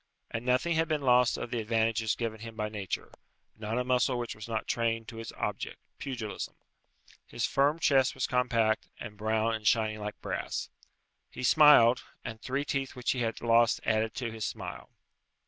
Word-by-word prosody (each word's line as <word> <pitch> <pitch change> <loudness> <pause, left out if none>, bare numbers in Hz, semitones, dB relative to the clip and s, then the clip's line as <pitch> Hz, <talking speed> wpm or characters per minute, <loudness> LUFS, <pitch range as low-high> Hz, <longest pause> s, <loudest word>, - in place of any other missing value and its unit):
And 115 - -3
nothing 125 +7 +2
had 165 0 +2
been 155 -2 -1
lost 125 -1 +4
of 115 - -5
the 120 - -1
advantages 110 0 +1
given 115 -2 -3
him 115 0 -8
by 105 -1 -2
nature; 100 -4 -4 0.4
not 110 +2 -3
a 125 - +1
muscle 125 0 +2
which 120 -1 -3
was 105 0 -9
not 110 -2 -2
trained 115 -1 0
to 115 - -8
its 115 - -6
object, - - -4 0.2
pugilism. 120 -7 -5 0.7
His - - -2
firm 145 +3 +2
chest 135 -5 +3
was 130 - 0
compact, 115 -3 +1
and 105 - -7
brown 110 +2 0
and 110 -1 -2
shining 110 -2 +2
like 105 0 -6
brass. - - -4 0.6
He - - -8
smiled, 125 -4 +7 0.2
and 110 0 -6
three 135 +2 -2
teeth 135 -2 -2
which 125 -1 0
he 130 - -2
had 115 -2 -2
lost 115 0 +4
added 110 0 +1
to 120 -3 -3
his 110 -1 -6
smile. - - -5
115 Hz, 180 wpm, -30 LUFS, 110-125 Hz, 0.7 s, smiled